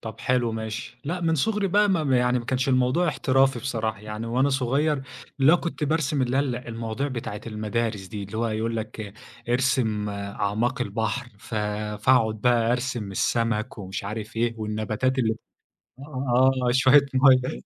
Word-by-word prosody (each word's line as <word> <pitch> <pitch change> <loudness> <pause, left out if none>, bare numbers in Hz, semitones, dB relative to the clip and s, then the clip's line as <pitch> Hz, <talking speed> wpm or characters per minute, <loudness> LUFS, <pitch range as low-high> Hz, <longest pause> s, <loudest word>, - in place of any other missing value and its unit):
طَب 110 -1 -8
حلو 125 -2 +1
ماشي، 110 +2 -5
لأ 175 +5 -3
من 165 -1 +1
صغري 210 +6 +1
بقى 205 +3 +3
م - - +3
ما 150 -7 +2
يعني 125 0 +2
ما 120 - -6
كانش 130 +2 -1
الموضوع 130 +7 +2
احترافي 135 -3 +2
بصراحة 110 -4 -3
يعني، 105 +2 -6
وأنا 130 +4 +2
صغير 135 +2 +1 0.4
اللي 135 +4 +6
هو - - +6
كنت 170 -3 -3
بارسم 150 -2 0
اللي 125 +1 0
هي - - +4
ال 135 -4 -1
المواضيع 115 +2 -4
بتاعة 115 -5 -5
المدارس 110 -2 -2
دي، 105 +1 -6
اللي 100 +2 -7
هو 115 0 +1
يقول 115 +1 -2
لك 110 -2 -6 0.4
ارسم 120 -4 +1
أعماق 100 +4 -2
البحر، 110 +3 -2
ف 115 - -9 0.5
فاقعد 110 -4 +3
بقى 120 0 +3
أرسم 125 -4 -2
السمك 115 +3 -1
ومش 95 -1 -5
عارف 110 +2 -6
إيه، 115 0 +1
والنباتات 110 +4 -1
اللي 110 -3 +2 0.6
آه، 130 -2 +2 0.2
شوية 135 +3 +5
مَيّة 130 -1 +4
120 Hz, 165 wpm, -25 LUFS, 110-135 Hz, 0.6 s, اللي